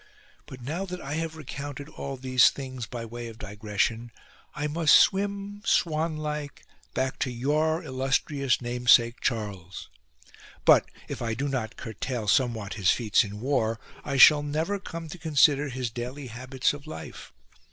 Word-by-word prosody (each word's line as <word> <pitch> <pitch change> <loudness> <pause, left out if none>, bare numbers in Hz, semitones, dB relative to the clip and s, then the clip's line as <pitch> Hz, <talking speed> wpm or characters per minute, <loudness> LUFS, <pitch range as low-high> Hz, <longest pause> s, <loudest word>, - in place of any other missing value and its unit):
But 130 -1 -10
now 160 +9 -3
that 180 0 -5
I 140 -2 -5
have 160 0 -3
recounted 145 -1 -7
all 140 -3 -6
these 130 -1 +5
things 130 -4 -6
by 115 0 -6
way 120 +1 -7
of 115 -1 -10
digression 110 +2 -2 0.4
I 150 - -2
must 155 +1 +4
swim 200 +1 +2
swan 160 -3 +1
like 150 -2 -5 0.3
back 130 0 -1
to - - 0
your 155 +7 0
illustrious 135 -1 0
namesake 120 0 +4
Charles. 100 -6 -3 0.8
But, - - +6 0.2
if - - -6
I 115 -1 -1
do 140 +4 -2
not 125 -5 -3
curtail 115 0 -4
somewhat 115 -4 +1
his 95 -4 +1
feats 110 -4 +3
in 105 0 -7
war, 115 -4 0 0.2
I 140 -2 -2
shall 145 +3 +9
never 160 +7 -1
come 165 -3 -7
to 180 - -8
consider 145 -2 +3
his 125 -2 -3
daily 125 +4 -6
habits 130 +4 -1
of 145 +1 -10
life. 155 - -9
130 Hz, 155 wpm, -27 LUFS, 120-150 Hz, 0.8 s, shall